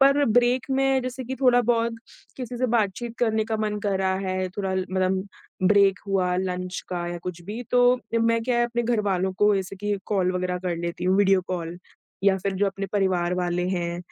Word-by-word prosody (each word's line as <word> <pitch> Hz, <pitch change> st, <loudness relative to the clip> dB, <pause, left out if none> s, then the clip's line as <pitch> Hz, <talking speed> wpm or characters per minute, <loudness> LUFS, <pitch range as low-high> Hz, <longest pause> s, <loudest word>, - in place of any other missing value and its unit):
पर 275 Hz, +1 st, +5 dB
ब्रेक 245 Hz, +2 st, +2 dB
में 270 Hz, 0 st, +2 dB
जैसे 255 Hz, 0 st, -5 dB
कि 260 Hz, +3 st, -4 dB
थोड़ा 245 Hz, -2 st, +5 dB
बहुत, 230 Hz, 0 st, +1 dB, 0.4 s
किसी 250 Hz, -2 st, -6 dB
से 255 Hz, -, +1 dB
बातचीत 225 Hz, +3 st, -2 dB
करने 220 Hz, -2 st, +1 dB
का 220 Hz, 0 st, -2 dB
मन 210 Hz, -1 st, -2 dB
करा 190 Hz, -1 st, +1 dB
है 185 Hz, 0 st, -1 dB
थोड़ा 190 Hz, 0 st, -3 dB
ल 185 Hz, 0 st, -1 dB
मतलब 185 Hz, 0 st, +1 dB, 0.5 s
ब्रेक 200 Hz, -2 st, +4 dB
हुआ 185 Hz, -2 st, +1 dB
लंच 180 Hz, -1 st, -3 dB
का 175 Hz, -1 st, -3 dB
या 175 Hz, 0 st, -4 dB
कुछ 175 Hz, -1 st, -6 dB
भी 215 Hz, +7 st, -6 dB
तो, 245 Hz, 0 st, +4 dB, 0.2 s
मैं 230 Hz, 0 st, +2 dB
क्या 245 Hz, 0 st, 0 dB
है 240 Hz, -, +3 dB
अपने 240 Hz, 0 st, -1 dB
घरवालों 200 Hz, -5 st, 0 dB
को 210 Hz, 0 st, +4 dB
जैसे 190 Hz, 0 st, -4 dB
कि 205 Hz, +1 st, -1 dB
कॉल 185 Hz, -3 st, +1 dB
वग़ैरह 180 Hz, 0 st, -2 dB
कर 175 Hz, -2 st, -2 dB
लेती 170 Hz, +1 st, -4 dB
हूँ, 185 Hz, +1 st, +3 dB
वीडियो 195 Hz, -2 st, +4 dB
कॉल 175 Hz, -1 st, -4 dB, 0.5 s
या 195 Hz, -1 st, +5 dB
फिर 195 Hz, -, 0 dB
जो 200 Hz, +1 st, +2 dB
अपने 195 Hz, 0 st, -3 dB
परिवार 185 Hz, -3 st, +1 dB
वाले 180 Hz, -1 st, -1 dB
हैं 175 Hz, -2 st, -2 dB
195 Hz, 205 wpm, -25 LUFS, 185-235 Hz, 0.5 s, पर